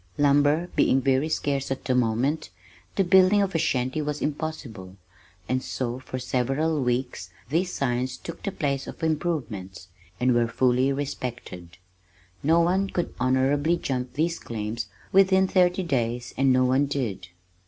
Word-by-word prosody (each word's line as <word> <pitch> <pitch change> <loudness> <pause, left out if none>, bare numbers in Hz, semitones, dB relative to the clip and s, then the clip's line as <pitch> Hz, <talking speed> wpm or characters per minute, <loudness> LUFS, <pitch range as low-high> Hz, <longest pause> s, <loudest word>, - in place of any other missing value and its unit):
Lumber 145 +3 +3
being 135 - +4
very 135 +3 +1
scarce 140 -3 -1
at 135 - -4
the 130 - +1
moment, 125 +5 0 0.5
the 195 - +3
building 190 +2 +5
of 195 - -2
a 165 - +1
shanty 130 +1 0
was 150 0 -3
impossible, 140 - -5 0.5
and 130 0 0
so 125 -1 -3
for 130 0 -6
several 135 +5 0
weeks 125 0 -2 0.2
these 175 +5 0
signs 130 -2 -1
took 170 - -9
the 200 - -3
place 140 -5 -2
of - - -9
"improvements" 115 - -3 0.3
and 125 +1 +3
were 120 -1 +2
fully 125 +3 +2
respected. 125 -11 -5 0.6
No 165 +4 +4
one 190 +3 +1
could 175 - -2
honorably 135 +6 +2
jump 125 -5 -3
these 165 +3 -1
claims 110 0 -4 0.2
within 190 0 +5
thirty 185 0 +2
days 120 -6 -2
and 135 0 +3
no 130 0 +4
one 130 +3 +2
did. 130 -8 -3
135 Hz, 150 wpm, -25 LUFS, 125-160 Hz, 0.6 s, building